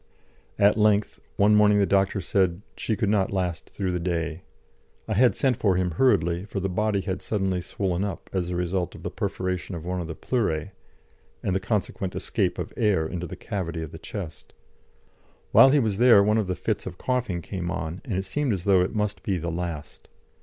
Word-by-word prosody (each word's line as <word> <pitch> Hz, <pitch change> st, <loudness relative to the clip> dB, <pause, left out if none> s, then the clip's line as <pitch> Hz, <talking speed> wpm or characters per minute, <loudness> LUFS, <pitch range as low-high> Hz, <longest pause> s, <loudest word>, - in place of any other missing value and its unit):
At 100 Hz, +2 st, +4 dB
length, 105 Hz, -1 st, +2 dB, 0.2 s
one 105 Hz, +1 st, +5 dB
morning 105 Hz, 0 st, +5 dB
the 100 Hz, -, +4 dB
doctor 95 Hz, 0 st, +2 dB
said 95 Hz, -1 st, +1 dB
she 110 Hz, -, -1 dB
could 105 Hz, -1 st, -1 dB
not 100 Hz, -2 st, +2 dB
last 90 Hz, -4 st, -2 dB
through 95 Hz, -3 st, -2 dB
the 90 Hz, -, -1 dB
day; 85 Hz, -1 st, -2 dB, 0.7 s
I 110 Hz, -, -1 dB
had 120 Hz, +4 st, +4 dB
sent 130 Hz, -4 st, +1 dB
for 100 Hz, -4 st, +2 dB
him 90 Hz, -1 st, 0 dB
hurriedly, 85 Hz, -4 st, +2 dB
for 100 Hz, -, -4 dB
the 95 Hz, 0 st, -1 dB
body 105 Hz, +2 st, 0 dB
had 95 Hz, -1 st, -3 dB
suddenly 95 Hz, -4 st, -1 dB
swollen 90 Hz, +1 st, -2 dB
up 100 Hz, -4 st, -5 dB
as 90 Hz, -2 st, -1 dB
a 90 Hz, -, -2 dB
result 90 Hz, 0 st, -1 dB
of -, -, -11 dB
the -, -, -3 dB
perforation 90 Hz, 0 st, -3 dB
of 85 Hz, -1 st, -7 dB
one 90 Hz, 0 st, -2 dB
of 85 Hz, -, -5 dB
the 80 Hz, -, -6 dB
pleurae, 100 Hz, -8 st, -1 dB, 0.7 s
and 95 Hz, -, 0 dB
the -, -, +2 dB
consequent 95 Hz, -2 st, -2 dB
escape -, -, -1 dB
of -, -, -5 dB
air 100 Hz, -8 st, +2 dB
into 90 Hz, +2 st, -4 dB
the -, -, -7 dB
cavity 85 Hz, -4 st, -4 dB
of 80 Hz, -, -7 dB
the -, -, -9 dB
chest. 85 Hz, -7 st, -8 dB, 1.0 s
While 135 Hz, -, +8 dB
he 145 Hz, -, +4 dB
was 110 Hz, -7 st, +1 dB
there 120 Hz, -5 st, +7 dB
one 105 Hz, +2 st, +3 dB
of 105 Hz, -, -1 dB
the 90 Hz, -, -1 dB
fits 105 Hz, +3 st, -2 dB
of 90 Hz, -1 st, -7 dB
coughing 120 Hz, -10 st, -1 dB
came 90 Hz, -3 st, -4 dB
on, 85 Hz, -1 st, -4 dB
and 115 Hz, -9 st, -3 dB
it 95 Hz, +1 st, -1 dB
seemed 140 Hz, +4 st, 0 dB
as 90 Hz, -3 st, -3 dB
though 95 Hz, -2 st, +4 dB
it 90 Hz, -, -1 dB
must 105 Hz, -1 st, -1 dB
be 95 Hz, -2 st, -1 dB
the 85 Hz, 0 st, -3 dB
last. 85 Hz, -3 st, -5 dB
95 Hz, 210 wpm, -25 LUFS, 90-105 Hz, 1.0 s, While